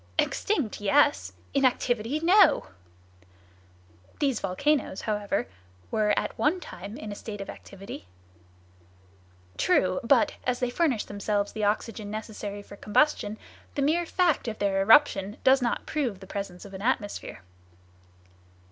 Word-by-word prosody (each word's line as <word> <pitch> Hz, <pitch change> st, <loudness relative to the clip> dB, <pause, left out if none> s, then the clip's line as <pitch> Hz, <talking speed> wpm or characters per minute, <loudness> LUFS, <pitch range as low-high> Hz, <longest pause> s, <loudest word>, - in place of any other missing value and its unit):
"Extinct, 300 Hz, -, 0 dB
yes! 95 Hz, -, +3 dB, 0.2 s
In 275 Hz, -, +2 dB
activity, 245 Hz, +1 st, +1 dB
no!" 360 Hz, -, +5 dB, 1.5 s
"These 275 Hz, -6 st, +1 dB
volcanoes, 230 Hz, +4 st, 0 dB
however, 205 Hz, -, -1 dB, 0.4 s
were 210 Hz, -1 st, +2 dB
at -, -, -1 dB
one 320 Hz, +5 st, +2 dB
time 200 Hz, -, -9 dB
in 215 Hz, -, -7 dB
a -, -, -5 dB
state 205 Hz, 0 st, -7 dB
of 195 Hz, -, -5 dB
activity?" 195 Hz, -, -10 dB, 1.5 s
"True, 185 Hz, 0 st, +2 dB
but, 240 Hz, 0 st, +4 dB
as 250 Hz, -1 st, -1 dB
they 250 Hz, -1 st, -1 dB
furnish 265 Hz, -6 st, +1 dB
themselves 205 Hz, 0 st, -2 dB
the 215 Hz, -1 st, -2 dB
oxygen 210 Hz, 0 st, -2 dB
necessary 210 Hz, -1 st, -6 dB
for 200 Hz, -, -12 dB
combustion, 215 Hz, -1 st, +1 dB, 0.4 s
the 280 Hz, -, 0 dB
mere 330 Hz, +4 st, +1 dB
fact 345 Hz, -8 st, +1 dB
of 220 Hz, -1 st, -3 dB
their 195 Hz, -1 st, +1 dB
eruption 205 Hz, -2 st, +4 dB
does 265 Hz, 0 st, +5 dB
not 240 Hz, -1 st, -1 dB
prove 255 Hz, -11 st, -2 dB
the 190 Hz, -, -11 dB
presence 195 Hz, -2 st, -6 dB
of 200 Hz, -, -11 dB
an 190 Hz, -, -7 dB
atmosphere." 210 Hz, -, -2 dB
215 Hz, 135 wpm, -27 LUFS, 200-265 Hz, 1.5 s, no